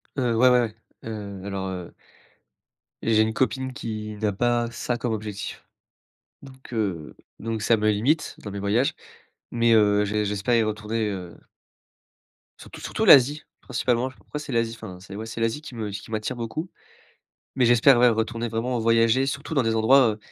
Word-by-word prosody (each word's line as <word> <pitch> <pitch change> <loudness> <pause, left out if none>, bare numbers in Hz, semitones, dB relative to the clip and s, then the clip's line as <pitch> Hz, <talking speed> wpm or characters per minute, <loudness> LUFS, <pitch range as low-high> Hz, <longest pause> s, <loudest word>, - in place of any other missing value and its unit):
Heu, 125 -4 0
ouais, 125 +2 +6
ouais, 125 0 +5
ouais. 110 -2 -3 0.3
Heu, 100 -3 -6
alors, 100 -1 -4
heu 90 -2 -7 1.1
j'ai 110 -1 +4
une 110 0 +1
copine 130 +2 -1
qui 110 -4 -5
n'a 105 -1 +1
pas 120 +3 0
ça 120 +1 -3
comme 120 0 -2
objectif 105 -1 -6 0.8
donc, 130 -2 -14
heu 95 -9 -3 0.2
donc 115 -1 -4
ça 115 - +4
me 110 0 +1
limite 130 +10 0
dans 105 - -6
mes 100 - -6
voyages. 105 +7 +1 0.6
Mais 115 -1 +3
heu, 105 -2 +4
j'é 105 +1 -1
j'espère 105 +4 0
y 115 - +4
retourner 110 +1 -2
heu 90 -4 -6 1.2
surtout - - -12
surtout - - -2
l'Asie 145 +3 +7 0.2
principalement, 125 0 0
après 140 +3 -9
c'est 145 - -7
l'Asie, 115 -1 0
enfin, 95 -5 -9 0.2
ouais, 110 +2 -5
c'est 115 +1 -7
l'Asie 115 +6 -1
qui 150 - -10
me 110 -3 -4
qui 105 +2 -8
m'attire 110 +2 -2
beaucoup, 120 +9 -5 0.9
mais 125 -3 +3
j'espère, 120 +2 +6
ouais, 125 0 +6
retourner 115 +1 -1
vraiment, 120 +2 -2
heu, - - -2
voyager 115 +3 +3
surtout 140 +3 -4
dans 135 - +3
des 115 -1 0
endroits, 110 -1 +4
115 Hz, 175 wpm, -24 LUFS, 105-125 Hz, 1.2 s, l'Asie